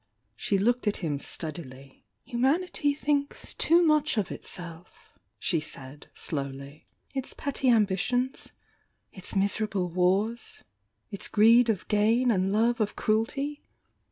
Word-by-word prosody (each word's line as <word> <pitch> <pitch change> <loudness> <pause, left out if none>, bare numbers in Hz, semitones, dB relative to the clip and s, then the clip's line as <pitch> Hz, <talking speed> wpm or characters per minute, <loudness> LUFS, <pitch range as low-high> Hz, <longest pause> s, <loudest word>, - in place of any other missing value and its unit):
She 200 - 0
looked 235 +4 +1
at 210 - +1
him 145 -3 -1
steadily. 140 -4 -6 0.2
"Humanity 285 +4 +1
thinks 285 -1 -2
too 340 +2 +4
much 305 -4 +2
of 205 - -1
itself," 175 -1 -8 0.2
she 170 - 0
said, 145 -2 -6
slowly. 140 0 -5 0.3
"Its 265 -1 -3
petty 275 -2 -1
ambitions, 235 +4 +1 0.3
— - - -45
its 190 0 -7
miserable 200 -1 0
wars, 195 +7 0 0.2
— - - -49
its 200 - -2
greed 230 +3 +5
of 200 -5 -1
gain 225 +4 +3
and 190 -2 +1
love 230 +3 +2
of 210 -1 -1
cruelty! 275 +7 -1
215 Hz, 130 wpm, -27 LUFS, 180-250 Hz, 0.3 s, greed